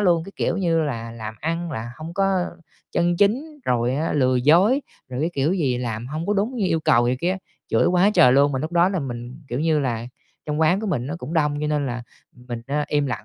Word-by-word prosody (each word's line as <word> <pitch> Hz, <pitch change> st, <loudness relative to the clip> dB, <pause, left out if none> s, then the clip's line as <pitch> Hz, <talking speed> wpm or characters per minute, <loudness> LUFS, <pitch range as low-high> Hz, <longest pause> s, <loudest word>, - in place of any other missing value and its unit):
luôn, 175 Hz, -5 st, +3 dB
cái 195 Hz, -, -10 dB
kiểu -, -, 0 dB
như 170 Hz, -4 st, +2 dB
là 115 Hz, -6 st, -3 dB
"làm 110 Hz, -1 st, -7 dB
ăn 165 Hz, +2 st, -2 dB
là 115 Hz, 0 st, -5 dB
hông 165 Hz, +2 st, -8 dB
có 195 Hz, -1 st, +2 dB, 0.7 s
chân 175 Hz, 0 st, +2 dB
chính", 260 Hz, -, +1 dB
rồi 125 Hz, 0 st, +1 dB
á, 155 Hz, +4 st, -1 dB
"lừa 130 Hz, -3 st, +2 dB
dối", 175 Hz, -, +4 dB, 0.3 s
rồi 130 Hz, 0 st, -4 dB
cái 160 Hz, +3 st, 0 dB
kiểu 140 Hz, +3 st, +1 dB
gì, 140 Hz, -10 st, 0 dB
"làm 115 Hz, -2 st, -4 dB
hông 155 Hz, +5 st, -4 dB
có 205 Hz, -, +1 dB
đúng 215 Hz, +6 st, 0 dB
như 205 Hz, -5 st, +1 dB
yêu 165 Hz, -3 st, +1 dB
cầu" 120 Hz, -5 st, +3 dB
này 125 Hz, +1 st, +1 dB
kia, 185 Hz, +2 st, 0 dB, 0.3 s
chửi -, -, +3 dB
quá 180 Hz, +3 st, +4 dB
trời 125 Hz, -, +7 dB
luôn. 140 Hz, +2 st, +4 dB
Mà 130 Hz, -, -1 dB
lúc 155 Hz, +5 st, -4 dB
đó 175 Hz, +1 st, +4 dB
là 190 Hz, -3 st, -1 dB
mình, 120 Hz, -1 st, -6 dB
kiểu 125 Hz, +3 st, -2 dB
như 160 Hz, -1 st, +2 dB
là, 120 Hz, -4 st, -2 dB, 0.4 s
trong 150 Hz, +1 st, -1 dB
quán 160 Hz, +5 st, +3 dB
của 220 Hz, -, -3 dB
mình 145 Hz, -, -1 dB
nó 145 Hz, -, -4 dB
cũng 150 Hz, +4 st, -6 dB
đông, 150 Hz, -2 st, +1 dB
cho 150 Hz, -, -1 dB
nên 150 Hz, -2 st, 0 dB
là 120 Hz, -1 st, -4 dB, 0.3 s
mình, 125 Hz, -1 st, -8 dB
a, 145 Hz, +2 st, 0 dB
im 145 Hz, -1 st, +1 dB
lặng 110 Hz, -5 st, -4 dB
150 Hz, 250 wpm, -23 LUFS, 125-175 Hz, 0.7 s, trời